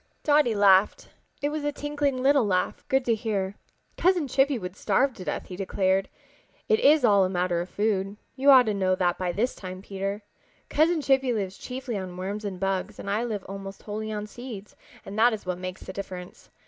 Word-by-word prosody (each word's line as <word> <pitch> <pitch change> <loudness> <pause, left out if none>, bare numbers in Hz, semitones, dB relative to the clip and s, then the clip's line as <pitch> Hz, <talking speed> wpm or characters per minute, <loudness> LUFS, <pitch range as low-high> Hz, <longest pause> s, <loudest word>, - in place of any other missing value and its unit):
Dotty 290 -6 +3
laughed. 200 -1 +4 0.3
It 290 - +2
was 300 0 -3
a 290 - 0
tinkling 285 -3 -2
little 280 -1 +5
laugh, 185 -3 0
good 265 -1 +1
to 235 - +3
hear. 205 -4 -2 0.4
"Cousin 355 -4 +2
Chippy 270 +1 +2
would 180 -3 -6
starve 250 +7 +1
to 185 - -9
death," 150 - -3
he 180 - -8
declared. 190 0 0 0.6
"It 440 -1 +3
is 295 -1 +5
all 200 -3 +5
a 185 - +1
matter 180 -2 0
of 175 - -6
food. 205 -1 -1 0.2
You 275 +2 +3
ought 260 -2 +8
to 215 - 0
know 190 -2 +1
that 180 -2 0
by 180 -1 -1
this 225 +8 0
time, 185 0 -8
Peter. 200 +1 -4 0.5
Cousin 315 +2 +3
Chippy 265 -2 +2
lives 195 -4 -3
chiefly 250 -1 -5
on 185 -1 -7
worms 200 +3 -4
and 190 -3 -4
bugs 195 -1 -2
and 200 - -5
I 215 +3 0
live 215 -5 -3
almost 195 0 -8
wholly 215 +1 -4
on 210 -1 -3
seeds, 215 -2 -9 0.3
and 205 +2 -5
that 240 +1 +5
is 215 - -6
what 180 -1 -3
makes 185 0 -6
the 190 - -8
difference. 185 -2 -8
205 Hz, 205 wpm, -26 LUFS, 190-260 Hz, 0.6 s, ought